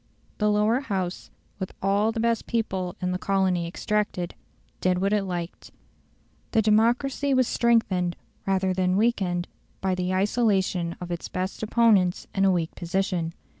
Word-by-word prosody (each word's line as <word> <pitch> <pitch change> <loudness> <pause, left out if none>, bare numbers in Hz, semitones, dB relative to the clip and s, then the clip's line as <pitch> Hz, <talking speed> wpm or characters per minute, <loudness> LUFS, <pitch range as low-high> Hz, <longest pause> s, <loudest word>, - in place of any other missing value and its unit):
The 210 0 +3
Lower 210 +4 +3
House, 190 -9 -3 0.3
with 190 - -4
all 200 +3 +2
the 225 - -4
best 230 0 0
people 190 -6 -2
in 180 - 0
the 180 - -2
colony 190 -3 +1
extracted, 195 -1 -2 0.5
did 185 -1 +2
what 195 +3 +1
it 205 -2 +1
liked. 175 -2 -5 0.8
The 220 - +5
democracy 245 +6 +2
was 255 -2 +3
strengthened 195 -7 +2 0.3
rather 190 -1 +1
than 185 0 +1
weakened 190 -6 +1 0.3
by 190 -1 0
the 180 0 -1
isolation 190 -3 +1
of 175 -1 -6
its 170 - -4
best 185 +1 -3
opponents 215 -5 +3
in 195 0 +2
a 190 - +5
weak 170 -3 -1
position. 175 -2 -2
190 Hz, 150 wpm, -26 LUFS, 180-220 Hz, 0.8 s, The